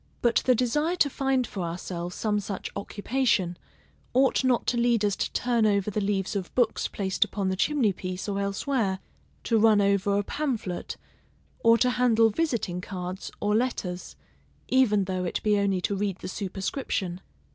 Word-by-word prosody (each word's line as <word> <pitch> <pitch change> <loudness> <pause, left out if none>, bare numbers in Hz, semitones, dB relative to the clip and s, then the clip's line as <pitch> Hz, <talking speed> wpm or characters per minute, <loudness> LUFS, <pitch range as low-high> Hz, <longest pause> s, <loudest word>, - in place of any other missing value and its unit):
But 235 -1 +3
the 255 - +6
desire 295 +9 +1
to 290 -5 +2
find 270 -2 +1
for 200 - -6
ourselves 175 +1 -4
some 210 -2 0
such 200 -1 -5
occupation, 205 -4 0 0.6
ought 265 +1 +3
not 255 -2 +2
to 245 - 0
lead 235 -3 +2
us 200 -2 +1
to - - -2
turn 235 -3 +2
over 200 0 +1
the 210 - -1
leaves 195 -1 -1
of 190 -3 -3
books 245 -2 +2
placed 190 -2 0
upon 195 -2 -2
the 190 - 0
chimney 235 -1 +2
piece 185 +1 -5
or 200 -1 -1
elsewhere; 200 0 0 0.5
to 225 -2 +2
run 215 -1 +5
over 200 0 +2
a 205 - +1
pamphlet; 230 -9 -3 0.6
or 230 0 +5
to 250 +2 +3
handle 230 -3 +4
visiting 215 - -1
cards, 180 0 -5
or 205 0 +1
letters, 205 -7 -2 0.5
even 225 -6 +3
though 185 -1 -2
it 175 - -2
be 210 -1 +3
only 195 -2 +1
to 200 - -1
read 195 -2 -1
the - - -7
superscription. 190 -1 -3
205 Hz, 170 wpm, -27 LUFS, 190-245 Hz, 0.6 s, the